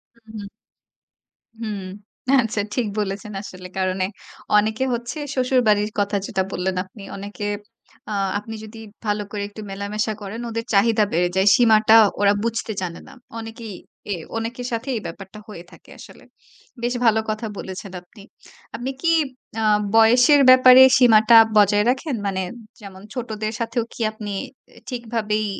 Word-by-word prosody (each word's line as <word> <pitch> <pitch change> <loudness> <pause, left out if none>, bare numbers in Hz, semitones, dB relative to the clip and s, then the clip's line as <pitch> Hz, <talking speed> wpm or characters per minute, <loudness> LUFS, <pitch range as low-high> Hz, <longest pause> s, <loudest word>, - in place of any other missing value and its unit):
হু, 230 - -26
উম। 205 -2 -7 1.1
হুম, 215 -3 -4 0.6
আচ্ছা। 220 -2 -2
ঠিক 245 -3 0
বলেছেন 205 +1 -3
আসলে। 185 -2 -10
কারণ 185 0 0
এ - - +1 0.5
অনেকে 220 +4 +1
হচ্ছে 240 +5 -5 0.2
শ্বশুরবাড়ির 235 -5 +2
কথা 205 0 0
যেটা 190 -2 -1
বললেন 185 +1 -2
আপনি, 195 +2 -15
অনেকে 205 +1 -7 0.7
আ - - -3 0.3
আপনি 225 +2 -8
যদি 220 +1 -11 0.3
ভালো 210 0 0
করে 205 -1 -4
একটু 210 +1 -11
মেলামেশা 210 +2 -3
করেন, 210 +4 -6
ওদের 230 0 -4
চাহিদা 215 +1 +4
বেড়ে 175 +2 +2
যায়। 190 +1 +2
সীমাটা 220 -2 +5 0.3
ওরা 200 0 +4
বুঝতে 230 -1 -2
জানে 170 -2 -5
না। - - -14 0.3
অনেকেই 225 -1 -8 0.4
এ - - 0 0.2
অনেকের 235 +2 -4
সাথেই 240 +4 -3
এই - - -10
ব্যাপারটা 195 +4 -9
হয়ে 175 -5 -10
থাকে - - -18
আসলে। - - -14 0.6
বেশ 245 +1 -1
ভালো 220 -1 +4
কথা 215 +1 -3
বলেছেন 190 +1 -7
আপনি। 195 +3 -17 0.5
আপনি 255 +3 -4
কি 335 - +2 0.5
আ - - -1 0.3
বয়সের 245 +6 +6
ব্যাপারে 255 0 +8 0.2
সীমাটা 230 -2 +6 0.2
বজায় 205 0 +4
রাখেন? 270 +2 -2
মানে 190 -1 -1 0.4
যেমন 195 -2 -11
ছোটদের 220 -3 -4
সাথেও 230 +1 -1
কি - - -13
আপনি 210 -1 -7 0.4
এ - - -21
ঠিকভাবেই 225 -3 -2
215 Hz, 150 wpm, -21 LUFS, 200-230 Hz, 1.1 s, ব্যাপারে